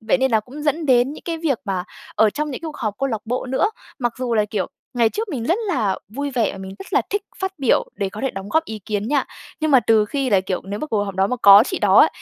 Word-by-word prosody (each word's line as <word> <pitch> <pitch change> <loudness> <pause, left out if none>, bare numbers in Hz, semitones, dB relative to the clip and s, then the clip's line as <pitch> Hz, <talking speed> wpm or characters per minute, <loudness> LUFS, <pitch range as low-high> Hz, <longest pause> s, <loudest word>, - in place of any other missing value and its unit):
Vậy 220 +4 +1
nên 265 0 +2
là 220 -2 +3
cũng 270 +7 -10
dẫn 305 +2 0
đến 255 +1 +4
những - - -11
cái 335 -1 -3
việc 300 -7 0
mà 190 -3 -2 0.3
ở 220 -1 +4
trong 300 +6 -3
những 260 - -5
cái 330 - -6
cuộc 310 - -7
họp 215 -5 -2
câu 275 - 0
lạc 220 -4 -2
bộ 250 +3 -2
nữa. 265 +11 +1 0.3
Mặc 240 -3 0
dù 245 -2 -1
là 215 - +3
kiểu 210 0 -2 0.3
ngày 235 -2 +4
trước 430 - -4
mình 260 -9 -3
rất 345 - +1
là 220 - 0
vui 280 +7 -4
vẻ 240 -5 0
và - - -9
mình 190 0 -8
rất - - -11
là - - +3
thích 410 0 0 0.2
phát 380 0 -2
biểu 265 -4 +3
để 200 - -1
có 205 +3 -8
thể 270 - 0
đóng 195 +1 -7
góp 320 +7 +2
ý 220 -6 -6
kiến 210 0 -2
nha. 280 -1 +2 0.4
Nhưng 310 0 +1
mà 265 -3 +7
từ 220 -2 +3
khi 270 +4 -2
là 195 -3 +4
kiểu 185 -1 -3
nếu 200 +2 -5
mà - - -3
cuộc 215 -7 0
họp 195 -2 -6
đó 190 +1 +2
mà 250 - -2
có 200 +1 +10
chị 370 - -2
đó - - +4
á, - - +7
245 Hz, 305 wpm, -21 LUFS, 210-285 Hz, 0.4 s, có